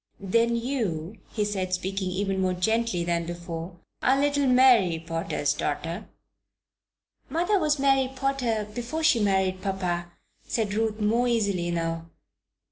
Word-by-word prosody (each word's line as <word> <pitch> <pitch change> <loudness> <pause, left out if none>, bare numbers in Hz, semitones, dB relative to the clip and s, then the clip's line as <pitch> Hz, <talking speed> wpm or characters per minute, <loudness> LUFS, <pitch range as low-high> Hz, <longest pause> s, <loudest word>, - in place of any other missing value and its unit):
"Then 230 +4 +2
you," 220 - -2
he 210 -2 0
said, 190 -3 -1
speaking 190 +1 -3
even 190 +1 -1
more 185 -1 +1
gently 220 0 +1
than 170 -1 -1
before, 170 0 -6 0.2
"are 265 +2 +3
little 285 -1 +2
Mary 250 -9 +5
Potter's 165 -3 -1
daughter?" 165 +6 -3 1.2
"Mother 350 +8 +1
was 305 -3 +2
Mary 270 -1 +3
Potter 255 -6 0
before 245 +8 -3
she 315 -7 +5
married 190 -2 +1
papa," 180 -3 -2 0.3
said 215 -3 -2
Ruth, 220 0 0
more 230 +4 +2
easily 200 -7 +1
now. 165 -1 -2
200 Hz, 130 wpm, -26 LUFS, 175-245 Hz, 1.2 s, Mary